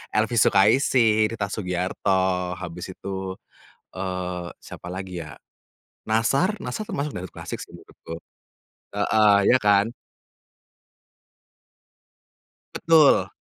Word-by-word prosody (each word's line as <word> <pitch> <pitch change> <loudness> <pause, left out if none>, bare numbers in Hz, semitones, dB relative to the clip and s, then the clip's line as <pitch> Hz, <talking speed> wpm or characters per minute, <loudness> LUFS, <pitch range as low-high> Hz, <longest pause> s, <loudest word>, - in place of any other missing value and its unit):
Elvy 110 +3 +1
Sukaesih, 110 +1 +4
Rita 100 -3 -3
Sugiarto, 90 -1 -1
habis 90 +1 -7
itu, 95 -1 -5 0.6
eee, 90 -1 -4
siapa 90 - -10
lagi 95 -2 -6
ya? 75 - -10 0.8
Nassar, 135 - +1
Nassar 215 - -4
termasuk 145 +1 -3
dangdut 90 0 -7
klasik - - -6
sih - - -10
menurutku, 80 - -11 0.8
heeh, 105 0 +4
iya 130 - +6
kan? 105 +1 +3 2.8
Betul. 160 -3 +4
100 Hz, 95 wpm, -24 LUFS, 90-110 Hz, 2.8 s, iya